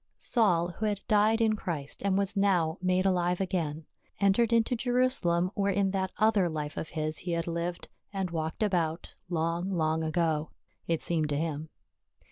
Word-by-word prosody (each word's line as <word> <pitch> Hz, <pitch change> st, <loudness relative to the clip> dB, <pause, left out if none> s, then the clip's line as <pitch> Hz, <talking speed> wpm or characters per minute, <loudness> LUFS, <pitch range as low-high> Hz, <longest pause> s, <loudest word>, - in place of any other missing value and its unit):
Saul, 180 Hz, -8 st, +2 dB
who 220 Hz, -, +1 dB
had 205 Hz, -2 st, -1 dB
died 215 Hz, +2 st, +3 dB
in 220 Hz, -1 st, +3 dB
Christ 155 Hz, -8 st, -4 dB
and 195 Hz, -1 st, +2 dB
was 200 Hz, 0 st, -1 dB
now 180 Hz, -5 st, +2 dB
made 185 Hz, +1 st, +2 dB
alive 180 Hz, -2 st, +2 dB
again, 165 Hz, -5 st, -2 dB, 0.3 s
entered 200 Hz, +4 st, +3 dB
into 230 Hz, +1 st, +3 dB
Jerusalem 245 Hz, -8 st, +1 dB
where 200 Hz, 0 st, +1 dB
in 195 Hz, 0 st, +1 dB
that 190 Hz, -1 st, -1 dB
other 215 Hz, -5 st, +3 dB
life 150 Hz, -2 st, -4 dB
of 160 Hz, -, -4 dB
his 155 Hz, -1 st, -3 dB
he 175 Hz, -1 st, -3 dB
had 170 Hz, 0 st, -1 dB
lived 170 Hz, +1 st, -3 dB, 0.2 s
and 190 Hz, -3 st, -2 dB
walked 160 Hz, +4 st, -2 dB
about, 170 Hz, -5 st, -1 dB, 0.2 s
long, 170 Hz, +2 st, -1 dB
long 160 Hz, -3 st, 0 dB
ago 160 Hz, -1 st, 0 dB, 0.2 s
— -, -, -42 dB
it 165 Hz, -1 st, 0 dB
seemed 160 Hz, -3 st, 0 dB
to 145 Hz, -, 0 dB
him. 155 Hz, 0 st, -3 dB
180 Hz, 175 wpm, -29 LUFS, 160-200 Hz, 0.3 s, died